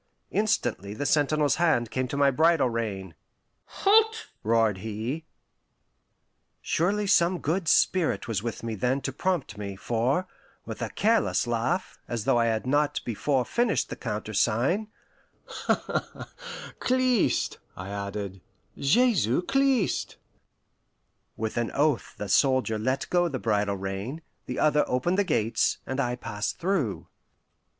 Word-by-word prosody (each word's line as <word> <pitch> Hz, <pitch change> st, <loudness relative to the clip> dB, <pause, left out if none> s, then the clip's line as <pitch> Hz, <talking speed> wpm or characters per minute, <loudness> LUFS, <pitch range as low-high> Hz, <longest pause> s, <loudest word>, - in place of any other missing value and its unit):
Instantly 120 Hz, -, 0 dB
the 145 Hz, -, -3 dB
sentinel's 145 Hz, 0 st, +2 dB
hand 155 Hz, -9 st, +2 dB
came 130 Hz, 0 st, -1 dB
to 140 Hz, -, -4 dB
my 140 Hz, -1 st, +4 dB
bridle 155 Hz, -2 st, +3 dB
rein. 100 Hz, -6 st, -3 dB, 0.5 s
"Halt!" 445 Hz, +2 st, +2 dB
roared 110 Hz, -3 st, +2 dB
he. 110 Hz, +9 st, -4 dB, 1.3 s
Surely 200 Hz, +5 st, 0 dB
some 180 Hz, -2 st, +3 dB
good 170 Hz, +2 st, -1 dB
spirit 180 Hz, -4 st, +2 dB
was 110 Hz, -4 st, -1 dB
with 115 Hz, 0 st, -5 dB
me 115 Hz, -1 st, -3 dB
then 125 Hz, +6 st, 0 dB
to 130 Hz, -, -4 dB
prompt 150 Hz, -, -2 dB
me, 100 Hz, -1 st, -5 dB
for, 120 Hz, -, 0 dB, 0.4 s
with -, -, -7 dB
a -, -, -2 dB
careless 225 Hz, -, +2 dB
laugh, 120 Hz, +9 st, -1 dB
as 115 Hz, -3 st, -3 dB
though 120 Hz, -, +3 dB
I 115 Hz, -, +3 dB
had 110 Hz, 0 st, -1 dB
not 145 Hz, +2 st, +1 dB
before 125 Hz, +3 st, 0 dB
finished 240 Hz, -2 st, 0 dB
the -, -, -3 dB
countersign, 115 Hz, -, 0 dB, 1.9 s
"Christ," 255 Hz, -3 st, +1 dB, 0.2 s
I 90 Hz, +1 st, -6 dB
added 100 Hz, -1 st, -5 dB, 0.3 s
"Jesu 180 Hz, -, +2 dB
Christ!" 270 Hz, -2 st, +1 dB, 1.2 s
With 110 Hz, +1 st, -3 dB
an 120 Hz, -1 st, 0 dB
oath 145 Hz, -3 st, +1 dB
the 105 Hz, -, -4 dB
soldier 130 Hz, 0 st, +2 dB
let 130 Hz, +5 st, -1 dB
go 175 Hz, -1 st, +3 dB
the 140 Hz, -6 st, -3 dB
bridle 105 Hz, -4 st, 0 dB
rein, 100 Hz, +11 st, -5 dB, 0.2 s
the -, -, -4 dB
other 150 Hz, -1 st, +3 dB
opened 175 Hz, +10 st, 0 dB
the -, -, +4 dB
gates, 115 Hz, -, +1 dB
and 130 Hz, +1 st, -3 dB
I 125 Hz, -2 st, 0 dB
passed 105 Hz, -2 st, -4 dB
through. 170 Hz, -, -1 dB
130 Hz, 130 wpm, -27 LUFS, 110-175 Hz, 1.9 s, my